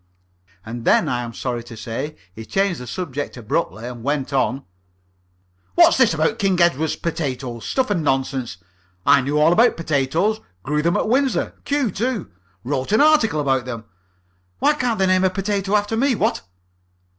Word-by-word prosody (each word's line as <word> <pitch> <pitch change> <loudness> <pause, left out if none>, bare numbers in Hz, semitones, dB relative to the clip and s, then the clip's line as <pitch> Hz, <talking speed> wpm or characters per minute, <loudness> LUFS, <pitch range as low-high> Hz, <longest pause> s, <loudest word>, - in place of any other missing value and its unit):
And 115 +1 -6
then - - +3
I 120 0 -1
am 120 -1 -5
sorry 120 0 -4
to 115 -1 -10
say 115 +8 -5 0.2
he 110 - -8
changed 195 - 0
the 125 - -8
subject 145 -6 -4
abruptly. 110 -1 -2
He 125 - -4
went 135 +3 -3
on: 135 0 0 1.1
"What's - - +6
this 235 -10 +4
about 160 +9 0
King 195 -3 +1
Edward 160 -3 +2
potatoes? 130 -8 -3
Stuff 260 -5 0
and 180 -5 +1
nonsense! 135 -5 -1 0.5
I 140 0 +6
knew 140 +3 -1
all 160 +3 +5
about 235 +6 +4
potatoes. 165 +7 0 0.2
Grew 150 +2 0
them 170 +2 +1
at - - 0
Windsor. 265 +3 +1
Kew 280 -6 0
too. 230 0 -2 0.3
Wrote 130 +4 -2
an 215 - +4
article 290 - +4
about 135 -3 +1
them. 115 -3 -6 0.7
Why 300 - +3
can't 250 -6 -1
they 190 - +2
name 185 0 +3
a 190 - +4
potato 195 +1 -1
after 205 +1 +1
me? 260 +2 +2
What?" 200 - 0
155 Hz, 170 wpm, -21 LUFS, 130-205 Hz, 1.1 s, What's